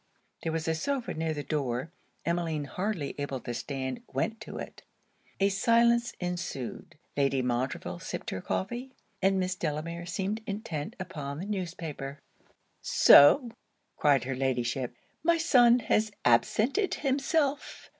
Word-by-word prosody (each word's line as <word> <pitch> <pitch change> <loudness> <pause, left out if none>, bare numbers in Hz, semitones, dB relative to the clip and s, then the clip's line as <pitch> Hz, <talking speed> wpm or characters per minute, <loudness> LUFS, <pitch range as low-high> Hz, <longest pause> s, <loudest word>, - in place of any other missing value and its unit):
There 165 - -2
was 160 0 -2
a 160 - +2
sofa 255 - -2
near 160 0 -1
the 145 - -4
door. 140 0 -2 0.3
Emmeline, 170 -3 0
hardly 175 - -3
able 140 -2 -3
to 120 - -5
stand, 130 - -4
went 225 0 -2
to - - -7
it. - - -8 0.6
A 195 0 +4
silence 235 +4 +3
ensued. 175 -9 -5 0.2
Lady 135 -2 +2
Montreville 125 +1 -2
sipped - - -5
her 95 - -4
coffee; 240 - -3 0.3
and 195 0 +3
Miss 185 0 0
Delamere 170 0 -4
seemed 200 +4 -2
intent 200 -3 -4
upon 145 -6 -5
the 180 - -5
newspaper. 170 -8 -4 0.6
'So!' 235 - +7 0.4
cried 145 -3 +3
her 135 +2 -2
Ladyship, 125 -1 -1 0.3
'my 335 +1 +3
son 250 -8 +6
has 215 -2 +1
absented 220 - +3
himself! 280 +1 0
170 Hz, 135 wpm, -29 LUFS, 140-225 Hz, 0.6 s, So